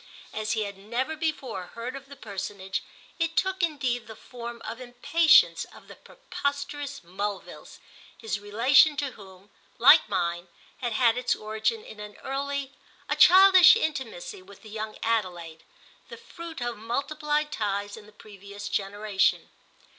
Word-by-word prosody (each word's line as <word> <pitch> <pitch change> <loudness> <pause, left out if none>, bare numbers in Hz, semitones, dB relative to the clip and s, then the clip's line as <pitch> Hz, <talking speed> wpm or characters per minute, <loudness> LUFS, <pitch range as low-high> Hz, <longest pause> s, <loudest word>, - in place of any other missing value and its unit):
As 215 0 -2
he 220 -1 0
had 200 -1 -7
never 240 +9 -3
before 295 - -3
heard 235 +3 -5
of 275 0 -10
the 280 - -10
personage 200 -3 -5 0.4
it 330 0 -1
took 380 0 +1
indeed 270 -8 -1
the 220 - -9
form 235 0 -9
of 230 +3 -6
impatience 305 +7 +4
of - - -17
the - - -12
preposterous 285 -1 -5
Mulvilles, 195 +3 -6 0.4
his 215 -3 -3
relation 260 +9 +4
to 280 -2 -2
whom, 195 -2 -15 0.3
like 240 +2 +7
mine, 175 -2 -1 0.3
had 240 -3 -3
had 235 +1 +3
its 250 - +1
origin 220 +1 -2
in 215 - -11
an 210 0 -9
early, 275 0 -3 0.4
a - - +1
childish 370 0 +8
intimacy 265 - -4
with 195 +1 -16
the 215 - -12
young 215 0 -5
Adelaide, 175 -8 -2 0.5
the 470 - -9
fruit 335 - -10
of 240 -2 -3
multiplied 295 +6 -2
ties 205 -3 -2
in 210 -2 -13
the - - -16
previous 205 -1 -10
generation. 205 0 0
230 Hz, 145 wpm, -27 LUFS, 205-280 Hz, 0.5 s, childish